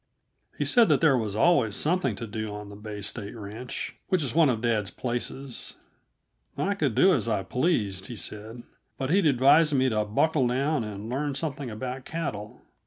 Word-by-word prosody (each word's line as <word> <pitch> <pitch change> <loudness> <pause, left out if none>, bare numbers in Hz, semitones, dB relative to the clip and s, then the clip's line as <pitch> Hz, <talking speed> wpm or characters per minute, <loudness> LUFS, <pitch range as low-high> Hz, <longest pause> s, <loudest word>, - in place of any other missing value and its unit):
He - - 0
said 235 -3 +5
that - - +4
there 155 -5 +5
was 110 -5 -1
always 115 -5 +3
something 155 - +1
to 115 - -6
do 110 -1 -5
on 105 0 -8
the 100 - -10
Bay 105 0 -7
State 100 +1 -4
Ranch 110 +3 -6
which 185 -5 +1
is 130 - -2
one 160 -2 +5
of 115 -4 0
dad's 110 -4 0
places. 125 +1 -5 0.8
I 200 - +1
could 145 - -1
do 190 0 +6
as 115 - 0
I 105 -4 0
pleased, 105 - 0
he 120 - -7
said, 110 +3 -7 0.3
but 135 +1 -2
he'd 190 -2 +4
advise 145 +4 +5
me 130 0 +3
to 105 -2 +1
buckle 130 +5 +2
down 135 +2 0
and 105 0 -6
learn 140 +3 -2
something 140 -2 -3
about 125 +4 -5
cattle. 110 -11 -5
125 Hz, 185 wpm, -27 LUFS, 105-145 Hz, 0.8 s, do